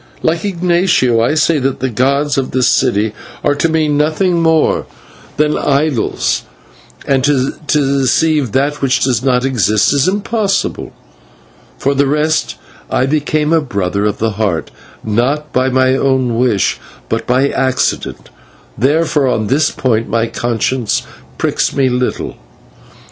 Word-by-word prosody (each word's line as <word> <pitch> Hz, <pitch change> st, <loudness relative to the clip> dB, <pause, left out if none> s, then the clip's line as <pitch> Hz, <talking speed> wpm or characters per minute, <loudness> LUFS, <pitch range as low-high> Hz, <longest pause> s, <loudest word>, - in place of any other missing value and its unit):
Like 165 Hz, +1 st, 0 dB
Ignatio, 175 Hz, -, +1 dB
I 120 Hz, +7 st, +1 dB
say 155 Hz, 0 st, +2 dB
that 135 Hz, 0 st, -2 dB
the 130 Hz, 0 st, -2 dB
gods 140 Hz, +5 st, +1 dB
of 135 Hz, -2 st, -1 dB
this 130 Hz, -2 st, +1 dB
city 105 Hz, +1 st, +1 dB, 0.3 s
are -, -, +2 dB
to 155 Hz, +3 st, 0 dB
me 160 Hz, -1 st, +1 dB
nothing 155 Hz, +4 st, +1 dB
more 160 Hz, -1 st, +2 dB, 0.5 s
than 150 Hz, 0 st, +2 dB
idols, 140 Hz, -3 st, 0 dB, 0.6 s
and 135 Hz, -2 st, +1 dB
to 135 Hz, -1 st, +1 dB, 0.2 s
deceive 140 Hz, -1 st, +1 dB
that 145 Hz, +5 st, 0 dB
which 135 Hz, -1 st, +1 dB
does 125 Hz, -3 st, +1 dB
not 130 Hz, -1 st, +1 dB
exist 110 Hz, -3 st, +2 dB
is 140 Hz, +2 st, +2 dB
impossible. 205 Hz, +1 st, -1 dB, 0.9 s
For 140 Hz, -, 0 dB
the 140 Hz, 0 st, +1 dB
rest, 150 Hz, +2 st, 0 dB, 0.3 s
I 130 Hz, -, +1 dB
became 150 Hz, +2 st, 0 dB
a 165 Hz, -, +3 dB
Brother 100 Hz, -6 st, -2 dB
of 105 Hz, -, -1 dB
the 115 Hz, 0 st, -1 dB
Heart 100 Hz, -6 st, -2 dB, 0.3 s
not 130 Hz, +8 st, -1 dB
by 130 Hz, +1 st, +2 dB
my 130 Hz, 0 st, +2 dB
own 130 Hz, -3 st, +1 dB
wish, 115 Hz, -5 st, +1 dB, 0.3 s
but -, -, -3 dB
by 130 Hz, +3 st, +2 dB
accident, 130 Hz, -1 st, -1 dB, 0.5 s
therefore 145 Hz, +3 st, +1 dB
on 110 Hz, -4 st, 0 dB
this 140 Hz, +7 st, +2 dB
point 115 Hz, -4 st, -1 dB
my 115 Hz, 0 st, +1 dB
conscience 120 Hz, 0 st, -1 dB, 0.3 s
pricks -, -, -1 dB
me 135 Hz, -2 st, +2 dB
little. 125 Hz, 0 st, -2 dB
135 Hz, 140 wpm, -15 LUFS, 125-150 Hz, 0.9 s, a